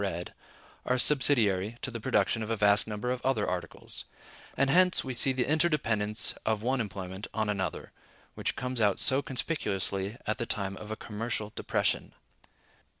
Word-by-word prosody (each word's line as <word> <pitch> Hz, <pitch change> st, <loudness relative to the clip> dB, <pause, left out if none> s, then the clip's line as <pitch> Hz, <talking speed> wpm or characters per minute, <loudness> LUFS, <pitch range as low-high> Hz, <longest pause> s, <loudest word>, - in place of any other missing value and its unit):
bread), 90 Hz, -3 st, -3 dB, 0.5 s
are 125 Hz, -, +1 dB
subsidiary 115 Hz, -7 st, +3 dB
to 135 Hz, -, -2 dB
the 115 Hz, -, -5 dB
production 105 Hz, +2 st, +1 dB
of 110 Hz, -, -4 dB
a 115 Hz, -, +1 dB
vast 105 Hz, +1 st, +4 dB
number 110 Hz, +3 st, -3 dB
of 125 Hz, 0 st, -3 dB
other 130 Hz, -6 st, +1 dB
articles; 90 Hz, -2 st, -5 dB, 0.5 s
and 135 Hz, 0 st, +3 dB
hence 180 Hz, +2 st, +4 dB
we 130 Hz, -, -4 dB
see 130 Hz, +2 st, +5 dB
the 130 Hz, -1 st, -1 dB
interdependence 125 Hz, -10 st, +1 dB
of 110 Hz, -1 st, 0 dB
one 130 Hz, +1 st, +1 dB
employment 95 Hz, -1 st, -6 dB
on 110 Hz, -2 st, 0 dB
another, 95 Hz, -5 st, -3 dB, 0.4 s
which -, -, -2 dB
comes 125 Hz, -2 st, -2 dB
out 105 Hz, -2 st, +3 dB
so 135 Hz, +1 st, +4 dB
conspicuously 105 Hz, -, -1 dB
at 110 Hz, -, -1 dB
the 120 Hz, -, -2 dB
time 100 Hz, -4 st, -1 dB
of 105 Hz, -, -9 dB
a 110 Hz, -, -3 dB
commercial 110 Hz, 0 st, -4 dB
depression. -, -, -1 dB
110 Hz, 165 wpm, -29 LUFS, 100-130 Hz, 0.5 s, see